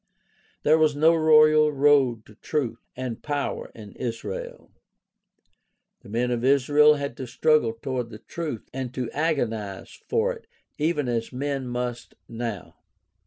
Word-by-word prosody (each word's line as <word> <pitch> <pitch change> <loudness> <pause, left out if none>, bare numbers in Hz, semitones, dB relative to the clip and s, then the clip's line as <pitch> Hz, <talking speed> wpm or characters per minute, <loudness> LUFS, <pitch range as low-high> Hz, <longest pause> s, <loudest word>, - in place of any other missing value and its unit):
There 155 +2 +4
was 155 -2 +3
no 160 +3 +5
royal 155 -1 +5
road 135 -5 +3
to 105 - -16
truth 120 0 -3 0.2
and 125 -3 -5
power 145 -1 -3
in 105 -3 -11
Israel. 115 -5 -6 1.3
The - - -15
men 120 +3 0
of 120 -1 -1
Israel 145 +3 +5
had 140 -1 -4
to 130 - -6
struggle 120 -1 +2
toward 125 +1 -4
the 110 - -9
truth 145 0 -6
and 130 -2 -4
to 125 -3 -3
agonize 115 -11 -2 0.2
for 475 +2 +1
it 470 - -14 0.3
even 150 -3 0
as 115 -2 -2
men 135 0 -3
must 120 -1 -4
now. 115 -5 -6
130 Hz, 140 wpm, -25 LUFS, 115-150 Hz, 1.3 s, no